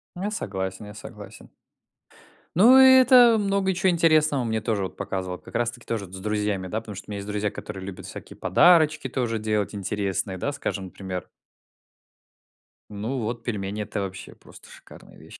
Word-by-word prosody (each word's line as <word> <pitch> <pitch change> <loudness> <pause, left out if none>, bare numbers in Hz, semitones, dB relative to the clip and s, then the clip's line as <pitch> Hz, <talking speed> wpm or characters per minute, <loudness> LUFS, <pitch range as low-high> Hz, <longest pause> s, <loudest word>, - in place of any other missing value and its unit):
Я 190 +4 -3
согласен, 95 - -4
я 105 - -10
согласен. 105 - -11 1.1
Ну 240 +9 +7
и 260 0 +9
это 245 -2 +7
много 195 -1 0
чё 190 +1 +1
интересного 155 -5 +3
мне 110 -1 -1
тоже 105 -3 -1
вот 95 - -6
показывал, 95 -1 -4
как 75 - -15
раз 120 0 +1
таки 120 - -15
тоже 110 -3 -3
вот 90 - -16
с 95 - -7
друзьями, 105 -2 -2
да. 105 +4 -2
Потому 110 -2 -9
что - - -9
у - - -9
меня 100 - -4
есть 100 0 -7
друзья, 105 0 -1
которые 95 -2 -8
любят 95 -2 -8
всякие - - -10
подарочки 150 - +4
тоже 120 -3 -2
делать 105 -1 -1
интересные, 100 -1 -2
да, 140 - -2
скажем, 100 -8 -4
например. 95 -1 -7 1.6
Ну 110 +6 -4
вот 115 +1 -4
пельмени, 105 -2 -3
это 105 0 -4
вообще 95 -1 -7
просто - - -17
шикарные - - -15
вещи. - - -14
105 Hz, 180 wpm, -25 LUFS, 100-150 Hz, 1.6 s, и